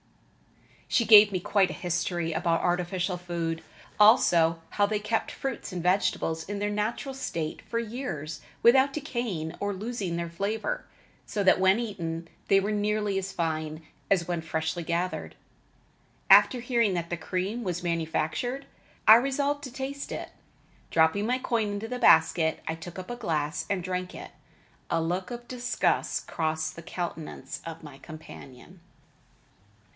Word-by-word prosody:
She 235 - +2
gave 210 -1 +9
me 185 - -1
quite 190 +1 +2
a - - -4
history 175 -1 -2
about 165 +1 +1
artificial 180 +1 0
food, 170 -2 -3 0.4
also 175 -7 +5
how 205 - +3
they 210 0 -1
kept 215 +2 -1
fruits 270 -6 -5
and 180 -1 -4
vegetables 175 -3 +1
in 205 - -3
their 205 +1 -1
natural 215 +6 -2
state 165 -11 -4
for 230 - -4
years 210 - -5 0.2
without 265 +3 +6
decaying 240 - -3
or 205 0 -1
losing 200 -3 -3
their 170 0 -2
flavor, 210 - -3 0.4
so 205 - -2
that 190 - +5
when 190 +3 +5
eaten 170 -7 -4 0.2
they 195 - +5
were 200 +2 -1
nearly 210 -1 0
as 190 0 -5
fine 155 -2 -3 0.2
as 180 -4 +2
when 175 -2 -1
freshly 160 +2 -2
gathered. 170 +2 -2 1.0
After 250 - +7
hearing 235 -5 +1
that 170 -1 -3
the - - +1
cream 185 +7 -3
was 180 -2 -3
manufactured, 170 - -1 0.4
I 215 - +12
resolved 280 +3 +1
to 260 - -7
taste 270 +2 -5
it. - - -5 0.6
Dropping 165 +6 +3
my 250 +1 +2
coin 230 -4 0
into 205 +2 -4
the 250 +1 -4
basket, 160 -5 +4
I 160 - 0
took 165 +2 -9
up 185 +5 -7
a - - -3
glass 155 -9 -2
and 195 -3 -1
drank 180 0 -3
it. - - -9 0.6
A 165 - +1
look 175 +3 -2
of 240 0 -7
disgust 245 0 0
crossed 160 -1 -2
the 170 - -8
countenance 165 -5 -6
of 165 0 -7
my 145 -3 -11
companion. 155 +2 -12
185 Hz, 155 wpm, -28 LUFS, 165-225 Hz, 1.0 s, I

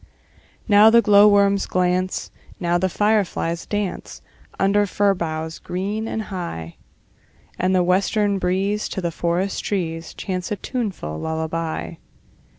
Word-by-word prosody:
Now 210 0 +7
the 235 +1 +5
glowworms 200 -1 +5
glance, 185 0 0 0.3
Now 175 -1 +1
the 185 +1 +1
fireflies 200 -5 0
dance, 205 -3 -4 0.4
Under 205 +1 +3
fern 200 +1 +2
boughs 160 -2 -4
green 205 +5 -3
and 220 - -3
high; 170 - -6 0.8
And 185 +1 +2
the 180 - +3
western 200 +2 +1
breeze 195 +3 0
To - - -4
the 170 -2 -2
forest 175 +4 -1
trees 165 -5 -3
Chants 185 -1 -4
a - - +1
tuneful 190 - -4
lullaby. 160 +1 -3
185 Hz, 125 wpm, -22 LUFS, 170-205 Hz, 0.8 s, Now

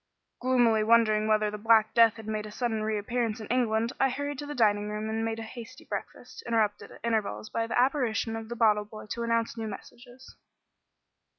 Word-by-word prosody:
Gloomily 240 -4 +3
wondering 215 -1 +4
whether 215 -1 +2
the 210 - -6
Black 220 0 +4
Death 230 -2 +6
had 220 -1 -10
made 215 0 -3
a - - -10
sudden 225 -1 -2
reappearance 220 +1 -1
in 220 - -7
England, 230 -1 +1
I 270 - +4
hurried 285 +1 -4
to 290 - -6
the 295 - -5
dining 210 -3 +2
room 210 +1 -4
and 225 0 -1
made 225 0 -2
a 225 - -5
hasty 230 +1 -10
breakfast, - - -7
interrupted 215 -3 0
at - - -14
intervals 220 -2 -2
by 230 0 -1
the 230 - 0
apparition 245 -4 +1
of 225 0 -7
the 240 - -4
bottle 210 -3 +3
boy 215 +1 -10
to 235 - -3
announce 230 0 0
new 220 - -3
messages. 245 +5 -11
225 Hz, 200 wpm, -28 LUFS, 215-235 Hz, -, Death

